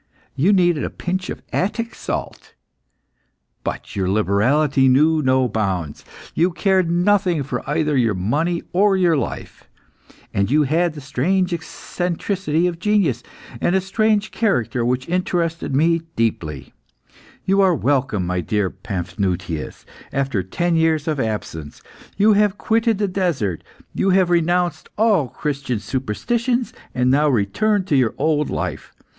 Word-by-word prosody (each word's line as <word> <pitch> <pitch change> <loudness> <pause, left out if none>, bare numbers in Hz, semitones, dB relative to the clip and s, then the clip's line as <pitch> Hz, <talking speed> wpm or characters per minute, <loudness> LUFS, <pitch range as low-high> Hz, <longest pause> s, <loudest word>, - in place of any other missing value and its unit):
You 170 +9 +3
needed 175 -6 +3
a - - -2
pinch 185 +1 -4
of - - -6
Attic 230 +4 -1
salt, - - -6 1.1
but - - -5
your 95 -2 0
liberality 130 +8 +2
knew 155 +5 +4
no 130 -2 +2
bounds. 95 -9 -2 0.3
You 170 +3 +2
cared 185 0 +1
nothing 180 -2 +2
for 135 - -4
either 150 -2 +1
your 115 -5 +2
money 150 - -1
or 195 +1 +3
your 175 -3 +3
life. 140 - -5 0.6
And 100 0 +1
you 150 +3 +4
had 160 +3 +1
the 160 +7 0
eccentricity 175 0 -2
of 175 -2 -2
genius, 185 - +1 0.4
and 175 - +2
a - - +4
strange 215 +2 0
character 125 - 0
which 125 +2 -1
interested 170 -4 -1
me 165 +3 +3
deeply. 80 - -2 0.7
You 195 +1 +3
are 185 -3 +4
welcome, 130 - 0
my 90 0 -1
dear 100 +3 -1
Paphnutius, 95 -3 -4 0.3
after 135 -7 -1
ten 170 - -1
years 160 -2 +1
of 155 -3 -1
absence. 105 - -4 0.4
You 210 +2 +5
have 205 -1 +2
quitted 225 -1 +1
the 205 0 0
desert; 165 - -1 0.3
you 195 - +1
have 185 -2 +3
renounced 175 -1 +1
all 210 - +3
Christian 140 -3 -3
superstitions, 225 - -2 0.2
and 125 0 +2
now 150 +2 +3
return 145 - +1
to 155 - +1
your 125 -4 +2
old 150 0 +1
life. - - -4
155 Hz, 140 wpm, -20 LUFS, 120-185 Hz, 1.1 s, You